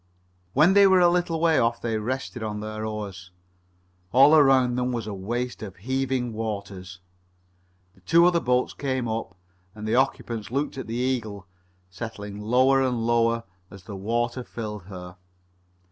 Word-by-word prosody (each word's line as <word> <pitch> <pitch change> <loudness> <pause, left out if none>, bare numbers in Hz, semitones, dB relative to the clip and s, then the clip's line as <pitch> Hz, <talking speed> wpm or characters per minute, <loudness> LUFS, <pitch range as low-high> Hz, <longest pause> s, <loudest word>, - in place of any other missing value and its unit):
When 155 +7 +5
they 200 0 +7
were 190 -1 +5
a 175 -1 +6
little 175 -2 0
way 165 -1 +3
off 115 0 +1
they 115 -2 -2
rested 125 +2 -4
on 105 -1 -4
their 110 0 -5
oars. 100 -4 -6 0.8
All 135 +5 +7
around 135 -4 +5
them 125 0 -1
was 115 -3 -3
a 105 - -5
waste 120 +6 -4
of 100 -4 -7
heaving 130 +2 -2
waters. 100 -4 -6 0.9
The - - -25
two 170 +1 +4
other 175 -1 +4
boats 125 -3 0
came 130 -3 -2
up, 110 -3 -4 0.4
and 110 0 -6
the 110 - 0
occupants 120 -4 0
looked 140 +5 -2
at 135 - -6
the 115 - -4
Eagle 120 -6 -2 0.5
settling 105 0 -7
lower 130 +5 +3
and 125 -3 0
lower 115 0 +2 0.3
as 100 -1 -13
the 100 +2 -8
water 120 +5 -2
filled 105 -6 -7
her. 90 -1 -10
115 Hz, 160 wpm, -25 LUFS, 105-130 Hz, 0.9 s, they